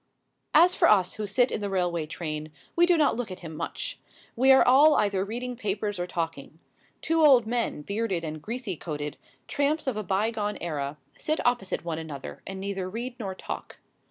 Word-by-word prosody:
As 350 Hz, +3 st, +7 dB
for -, -, +4 dB
us 190 Hz, -4 st, +4 dB
who 215 Hz, -1 st, -4 dB
sit 245 Hz, +5 st, +2 dB
in -, -, -2 dB
the 205 Hz, -, -2 dB
railway 175 Hz, -4 st, 0 dB
train, 155 Hz, -1 st, -5 dB, 0.2 s
we 345 Hz, +1 st, +5 dB
do 350 Hz, -1 st, +4 dB
not 300 Hz, -2 st, +3 dB
look 240 Hz, -2 st, -3 dB
at 185 Hz, 0 st, -8 dB
him 160 Hz, -2 st, -8 dB
much. -, -, -5 dB, 0.4 s
We 265 Hz, +3 st, +5 dB
are 265 Hz, -, +7 dB
all 290 Hz, +5 st, +7 dB
either 200 Hz, -2 st, +2 dB
reading 245 Hz, +4 st, -4 dB
papers 205 Hz, -3 st, -2 dB
or 175 Hz, -, -2 dB
talking. 165 Hz, -4 st, -4 dB, 0.5 s
Two 325 Hz, 0 st, +2 dB
old 260 Hz, -6 st, +7 dB
men, 230 Hz, -9 st, -1 dB
bearded 200 Hz, -2 st, -2 dB
and 155 Hz, -1 st, -5 dB
greasy 230 Hz, -1 st, -4 dB
coated, 150 Hz, -2 st, -5 dB, 0.3 s
tramps 290 Hz, +2 st, 0 dB
of 260 Hz, -5 st, -1 dB
a 215 Hz, -, -2 dB
bygone 210 Hz, +2 st, -1 dB
era, 150 Hz, -3 st, -3 dB, 0.2 s
sit 310 Hz, +1 st, 0 dB
opposite 240 Hz, -8 st, 0 dB
one 165 Hz, -2 st, -2 dB
another 150 Hz, -4 st, -7 dB
and 195 Hz, 0 st, -5 dB
neither 195 Hz, -1 st, -3 dB
read 240 Hz, +5 st, -5 dB
nor 195 Hz, -4 st, -4 dB
talk. -, -, -7 dB
200 Hz, 190 wpm, -27 LUFS, 170-245 Hz, 0.5 s, As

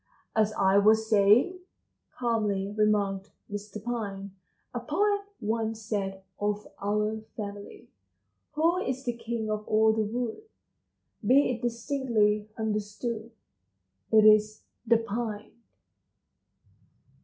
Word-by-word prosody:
"As 215 Hz, -1 st, +3 dB
I 195 Hz, +1 st, +4 dB
was 220 Hz, +2 st, +4 dB
saying," 220 Hz, -, +4 dB, 0.6 s
calmly 215 Hz, -5 st, 0 dB
remarked 205 Hz, -2 st, +1 dB, 0.2 s
Mr. 205 Hz, 0 st, -6 dB
Pine, 200 Hz, -5 st, -4 dB, 0.4 s
"a 245 Hz, -, -2 dB
poet 405 Hz, +11 st, +1 dB, 0.2 s
once 220 Hz, +1 st, -2 dB
said 195 Hz, -3 st, -3 dB, 0.2 s
of 210 Hz, 0 st, -1 dB, 0.2 s
our 210 Hz, +2 st, 0 dB, 0.2 s
family: 205 Hz, -1 st, -7 dB, 0.7 s
Who 330 Hz, +4 st, +2 dB
is 265 Hz, -6 st, -3 dB
the 240 Hz, -, 0 dB
king 230 Hz, -2 st, -4 dB
of 215 Hz, 0 st, -2 dB
all 220 Hz, 0 st, +4 dB
the 220 Hz, -, 0 dB
wood? 230 Hz, -, -3 dB, 0.8 s
Be 260 Hz, +6 st, +4 dB
it 240 Hz, -2 st, -4 dB
distinctly 230 Hz, -4 st, 0 dB
understood 220 Hz, +1 st, -3 dB, 0.8 s
It 215 Hz, -1 st, +6 dB
is 215 Hz, 0 st, +5 dB, 0.2 s
the 230 Hz, 0 st, +6 dB
Pine!" 220 Hz, -1 st, -4 dB
215 Hz, 110 wpm, -28 LUFS, 205-235 Hz, 0.8 s, It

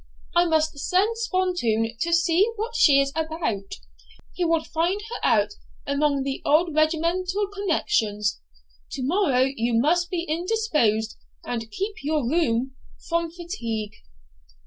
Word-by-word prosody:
I 345 Hz, 0 st, +5 dB
must 315 Hz, -3 st, +1 dB
send 390 Hz, +9 st, +1 dB
Spontoon 355 Hz, -, 0 dB
to 340 Hz, -, -1 dB
see 340 Hz, +5 st, +3 dB
what 455 Hz, +2 st, -4 dB
she 275 Hz, -3 st, +6 dB
is 275 Hz, 0 st, +1 dB
about; 315 Hz, -, -3 dB, 0.6 s
he 360 Hz, -, -2 dB
will 330 Hz, -2 st, +2 dB
find 345 Hz, +6 st, -1 dB
her -, -, -3 dB
out 210 Hz, -2 st, +3 dB, 0.3 s
among 280 Hz, -1 st, +1 dB
the 270 Hz, 0 st, -3 dB
old 320 Hz, +2 st, +3 dB
regimental 340 Hz, +6 st, +1 dB
connections. 240 Hz, -, 0 dB, 0.5 s
To 260 Hz, -, -4 dB
morrow 280 Hz, -5 st, +2 dB
you 230 Hz, 0 st, 0 dB
must 345 Hz, +7 st, +2 dB
be 345 Hz, -2 st, -2 dB
indisposed, 310 Hz, -, 0 dB, 0.3 s
and 230 Hz, -2 st, -4 dB
keep 400 Hz, -, -4 dB
your 295 Hz, -3 st, 0 dB
room 260 Hz, -4 st, +1 dB, 0.4 s
from 335 Hz, 0 st, 0 dB
fatigue. 235 Hz, -, -5 dB
315 Hz, 130 wpm, -24 LUFS, 245-355 Hz, 0.6 s, she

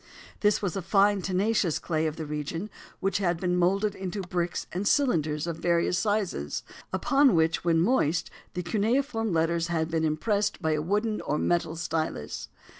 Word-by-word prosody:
This 210 Hz, 0 st, +2 dB
was 185 Hz, -5 st, -1 dB
a 195 Hz, -, -2 dB
fine, 200 Hz, +2 st, +3 dB
tenacious 190 Hz, -1 st, +1 dB
clay 160 Hz, -1 st, -1 dB
of 155 Hz, -, -3 dB
the 160 Hz, -, -5 dB
region 150 Hz, +7 st, -4 dB, 0.3 s
which 195 Hz, +1 st, +1 dB
had 175 Hz, -4 st, 0 dB
been 180 Hz, -1 st, 0 dB
moulded 195 Hz, +4 st, +2 dB
into 190 Hz, +1 st, -4 dB
bricks 175 Hz, -1 st, -2 dB
and 190 Hz, +3 st, -2 dB
cylinders 155 Hz, -, +2 dB
of 170 Hz, -2 st, -3 dB
various 170 Hz, +1 st, +1 dB
sizes, 205 Hz, -, -1 dB, 0.3 s
upon 270 Hz, +5 st, +3 dB
which 160 Hz, 0 st, +2 dB
when 165 Hz, -1 st, +3 dB
moist 165 Hz, -, +1 dB, 0.2 s
the 180 Hz, -, -2 dB
cuneiform 225 Hz, -, 0 dB
letters 165 Hz, 0 st, +1 dB
had 165 Hz, -1 st, -1 dB
been 160 Hz, -1 st, 0 dB
impressed 200 Hz, +7 st, 0 dB
by 160 Hz, -3 st, 0 dB
a 155 Hz, -1 st, +1 dB
wooden 210 Hz, +6 st, 0 dB
or 150 Hz, -, -1 dB
metal 170 Hz, -1 st, 0 dB
stylus. 160 Hz, -, -3 dB
175 Hz, 170 wpm, -27 LUFS, 160-205 Hz, 0.3 s, fine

